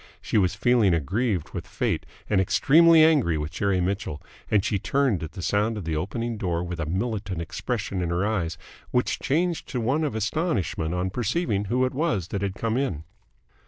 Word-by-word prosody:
She - - +1
was 95 -1 +1
feeling 105 -3 +3
aggrieved 95 - -1
with - - -6
Fate - - -2 0.2
and 100 -2 +3
extremely 160 - +6
angry 145 - +4
with 75 +1 -3
Jerry 95 +3 0
Mitchell, 90 -4 -2 0.3
and 105 -2 +2
she 100 - 0
turned 130 - +1
at 80 -1 -6
the 90 - -7
sound 105 +6 +1
of 100 - -6
the 80 -1 -1
opening 115 +8 -3
door 85 -3 -1
with 90 -1 -5
a 75 - -2
militant 95 0 -2
expression 95 +4 -3
in 85 - -1
her 85 +3 0
eyes, 95 -6 -1 0.3
which 125 - 0
changed 165 +3 0
to 125 - -2
one 135 +7 +1
of 145 -8 -1
astonishment 100 - -1
on 90 +1 -1
perceiving 120 - -1
who 125 +5 +1
it 130 - -2
was 130 - -1
that 100 - -3
had 100 -1 -2
come 115 +1 -1
in. 95 - -1
100 Hz, 195 wpm, -25 LUFS, 90-125 Hz, 0.3 s, extremely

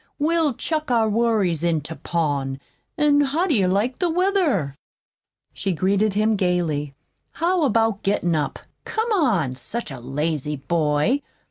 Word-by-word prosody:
We'll 315 -2 +1
chuck 310 +1 -2
our 230 -3 +3
worries 210 -7 +1
into 160 -2 -1
pawn, 145 -6 -2 0.4
An' 290 -1 +4
how 290 +6 +1
do 345 - +1
you 195 -7 +3
like 210 +7 0
the 355 - +1
weather?" 335 - +1 0.8
she 190 -1 -2
greeted 195 +4 +1
him 215 +1 +2
gayly. 165 -7 -1 0.4
"How 345 -1 +1
about 225 -4 +1
gettin' 185 -4 +1
up? 150 - -1 0.3
Come 445 +1 -2
on! 225 - +2
Such 145 - -6
a 135 - -7
lazy 150 +3 -2
boy! 150 - +1
200 Hz, 140 wpm, -22 LUFS, -, 0.8 s, An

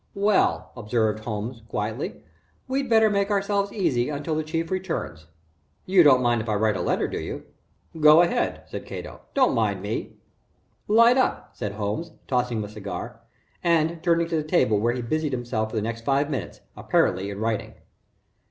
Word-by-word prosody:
"Well," 200 +1 +2
observed 110 -2 -1
Holmes, 115 +2 -4
quietly, 105 -5 -4 0.4
"we'd 265 0 -1
better 220 -1 +5
make 200 -1 +1
ourselves 200 0 0
easy 130 - 0
until 150 +2 -3
the 155 - 0
Chief 165 +2 -3
returns. 165 - -4 0.6
You 185 -1 +5
don't 130 -5 +6
mind 120 -1 +2
if 110 - -6
I 105 - +1
write 105 0 +2
a - - -2
letter, - - 0
do - - -4
you?" - - -6 0.5
"Go 155 +2 +8
ahead," 240 +8 -1
said - - -8
Cato. - - -8
"Don't - - +4
mind - - 0
me." - - -4 0.7
"Light 230 +4 +6
up," 105 - 0
said 100 +1 -4
Holmes, 105 +10 -3
tossing 125 -2 0
him 110 - -2
a 105 - -7
cigar, 105 +3 -7 0.4
and 165 -1 +2
turning 170 -1 +2
to 165 - -1
the 155 - +1
table 130 - +2
where 120 +3 +1
he 125 - -4
busied 155 +3 -1
himself 120 -3 -2
for 110 - -8
the 110 - 0
next 115 0 -4
five 140 +3 +1
minutes, 120 -11 -5
apparently 95 +2 +1
in 100 - -6
writing. 110 -1 -2
130 Hz, 180 wpm, -25 LUFS, 110-170 Hz, 0.7 s, Go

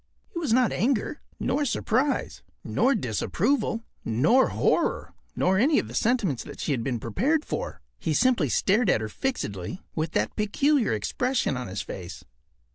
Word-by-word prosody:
It 340 - -3
was 310 -8 -1
not 245 -2 +4
anger, 245 - 0 0.2
nor 295 - 0
surprise, 260 +1 0 0.2
nor 270 +1 +2
disapproval, 220 - 0 0.2
nor 150 - +3
horror, - - 0 0.2
nor 190 +1 +2
any 285 +6 +4
of - - 0
the - - -10
sentiments 210 - +1
that - - -10
she - - -2
had 125 -5 0
been 125 -3 -2
prepared 270 - 0
for. - - -4 0.2
He 155 -2 -1
simply 235 - +3
stared 200 - +2
at - - +4
her 110 - -3
fixedly 105 - -4
with 160 0 -2
that 105 +1 0
peculiar 260 +5 +2
expression 250 - 0
on 125 -3 -4
his 95 +2 -4
face. 90 -1 -8
210 Hz, 160 wpm, -26 LUFS, -, 0.2 s, not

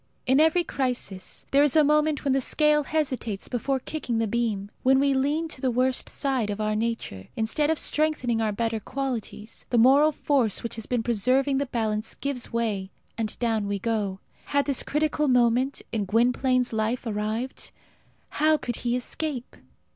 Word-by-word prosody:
In 260 +2 +4
every 320 +3 +4
crisis 250 - -3
there 280 - +5
is 290 -1 +3
a 310 - +6
moment 300 0 +2
when 275 -2 +2
the 270 - +2
scale 300 +2 +2
hesitates 255 -10 -2
before 265 +2 -1
kicking 255 -4 -3
the 225 - +1
beam. 215 -3 -2
When 265 +1 +4
we 280 0 +3
lean 290 +5 0
to 260 - -8
the 260 - +1
worst 255 +1 +1
side 265 -6 -1
of 205 0 -3
our 215 0 0
nature, 220 - -3
instead 235 +7 0
of 320 - +2
strengthening 295 -9 0
our 215 -1 +1
better 225 +1 -1
qualities, 240 -3 -5
the 245 - +1
moral 275 +6 +6
force 270 -7 0
which 235 - -4
has 225 -1 -6
been 245 -2 0
preserving 255 +5 +2
the 280 - -1
balance 220 -3 -2
gives 280 -3 -4
way, 215 -5 -1 0.3
and 220 -2 -3
down 225 -4 0
we 200 0 -1
go. 200 -2 -2 0.3
Had 285 0 +1
this 280 -3 +2
critical 300 0 0
moment 250 +1 +2
in 215 -3 -1
Gwynplaine's 250 +4 +2
life 220 +3 -1
arrived? 220 +3 -3 0.6
How 310 +1 +3
could 240 -5 -4
he 240 0 -1
escape? 255 +1 -4
250 Hz, 175 wpm, -26 LUFS, 225-280 Hz, 0.6 s, a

